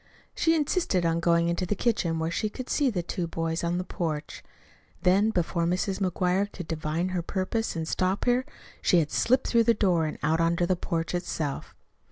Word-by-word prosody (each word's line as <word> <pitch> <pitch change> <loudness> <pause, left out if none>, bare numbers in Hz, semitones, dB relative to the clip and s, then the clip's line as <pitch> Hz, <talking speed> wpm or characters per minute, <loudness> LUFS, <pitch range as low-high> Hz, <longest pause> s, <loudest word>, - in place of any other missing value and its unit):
She 325 0 +2
insisted 295 - +1
on 165 0 +1
going 170 0 +3
into 175 +1 -1
the 205 - 0
kitchen 185 -7 0
where 160 +1 -1
she 215 +5 -1
could 255 +4 -7
see 285 -3 +2
the 185 -7 -2
two 175 0 -3
boys 165 0 -2
on 170 +1 0
the 180 - -1
porch. 160 -4 -4 0.6
Then, 195 +4 +4
before 170 -3 0
Mrs. 185 +2 -1
McGuire 185 +1 0
could 180 -4 -8
divine 160 +2 -2
her 180 -1 -1
purpose 195 +5 -2
and 160 -1 -3
stop 185 +3 0
her, 245 +1 +3 0.4
she 180 - +4
had 155 -3 +1
slipped 255 +2 +2
through 230 -1 +3
the 230 0 +4
door 175 -6 +2
and 155 - -5
out 160 +2 +2
on 165 +1 +2
to 175 - +1
the 185 +1 +1
porch 165 -1 -3
itself. 160 -5 -3
180 Hz, 205 wpm, -27 LUFS, 165-205 Hz, 0.6 s, Then